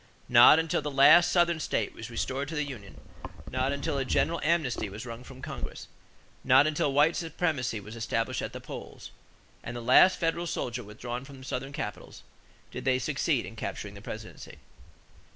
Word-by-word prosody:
Not 120 Hz, +4 st, +8 dB
until 160 Hz, -1 st, 0 dB
the 150 Hz, -, -3 dB
last 150 Hz, +6 st, +6 dB
Southern 170 Hz, -2 st, +3 dB
state 115 Hz, -8 st, -2 dB
was 115 Hz, +1 st, -9 dB
restored 130 Hz, +4 st, -3 dB
to 160 Hz, -, -6 dB
the 150 Hz, -, 0 dB
union, 120 Hz, -9 st, -9 dB, 0.5 s
not 130 Hz, +1 st, 0 dB
until 140 Hz, 0 st, -2 dB
a -, -, 0 dB
general 165 Hz, +5 st, 0 dB
amnesty 150 Hz, -10 st, 0 dB
was 105 Hz, +6 st, -8 dB
wrung 115 Hz, 0 st, -8 dB
from 130 Hz, 0 st, -13 dB
Congress, -, -, -7 dB, 0.6 s
not 130 Hz, +2 st, +6 dB
until 150 Hz, -2 st, 0 dB
white 150 Hz, +4 st, +4 dB
supremacy 155 Hz, -8 st, -2 dB
was 105 Hz, +3 st, -10 dB
established 115 Hz, 0 st, -2 dB
at -, -, -4 dB
the -, -, -7 dB
polls, -, -, -9 dB, 0.5 s
and 120 Hz, +1 st, -6 dB
the -, -, -4 dB
last 130 Hz, +10 st, +6 dB
federal 170 Hz, 0 st, -1 dB
soldier 125 Hz, -5 st, -3 dB
withdrawn 120 Hz, +4 st, -6 dB
from 135 Hz, -1 st, -12 dB
Southern 135 Hz, +1 st, -4 dB
capitals 105 Hz, -7 st, -7 dB, 0.5 s
did -, -, -6 dB
they 130 Hz, -1 st, +2 dB
succeed 130 Hz, -, 0 dB
in -, -, -10 dB
capturing -, -, -5 dB
the -, -, -11 dB
presidency. -, -, -9 dB
135 Hz, 175 wpm, -28 LUFS, 120-155 Hz, 0.6 s, Not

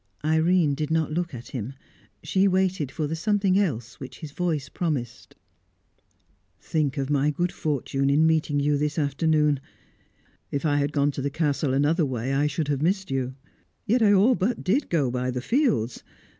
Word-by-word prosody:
Irene 160 Hz, 0 st, +3 dB
did 150 Hz, +1 st, -3 dB
not 160 Hz, -1 st, 0 dB
look 175 Hz, +2 st, -2 dB
at 120 Hz, -1 st, -9 dB
him; 125 Hz, 0 st, -5 dB, 0.5 s
she 190 Hz, +6 st, +2 dB
waited 185 Hz, -6 st, 0 dB
for 155 Hz, -, -2 dB
the 155 Hz, +2 st, -2 dB
something 200 Hz, +1 st, +2 dB
else 120 Hz, -, -2 dB
which 130 Hz, -, -9 dB
his 155 Hz, -3 st, -8 dB
voice 155 Hz, -4 st, -2 dB
promised. 140 Hz, -7 st, -4 dB, 1.2 s
"Think 150 Hz, -3 st, -1 dB
of 135 Hz, +1 st, -2 dB
my 145 Hz, 0 st, +2 dB
good 175 Hz, +4 st, -1 dB
fortune 140 Hz, -2 st, -1 dB
in 150 Hz, +3 st, +4 dB
meeting 155 Hz, -2 st, +2 dB
you 145 Hz, 0 st, +1 dB
this 150 Hz, 0 st, -1 dB
afternoon. 150 Hz, 0 st, +2 dB, 0.9 s
If 140 Hz, +2 st, -3 dB
I 145 Hz, -1 st, +2 dB
had 145 Hz, 0 st, 0 dB
gone 145 Hz, 0 st, +1 dB
to 140 Hz, -, -5 dB
the 140 Hz, -, -1 dB
Castle 145 Hz, -2 st, 0 dB
another 150 Hz, +5 st, +2 dB
way, 130 Hz, -1 st, -2 dB
I 145 Hz, +2 st, +2 dB
should 150 Hz, +1 st, -2 dB
have 140 Hz, -1 st, 0 dB
missed 190 Hz, 0 st, 0 dB
you; 130 Hz, -1 st, -2 dB, 0.5 s
yet 235 Hz, +4 st, +2 dB
I 210 Hz, -2 st, +5 dB
all 205 Hz, +6 st, +5 dB
but 230 Hz, +2 st, -1 dB
did 245 Hz, +10 st, +1 dB
go 145 Hz, -7 st, +1 dB
by 125 Hz, 0 st, -2 dB
the 125 Hz, 0 st, -2 dB
fields. 225 Hz, -, 0 dB
150 Hz, 180 wpm, -25 LUFS, 140-175 Hz, 1.2 s, I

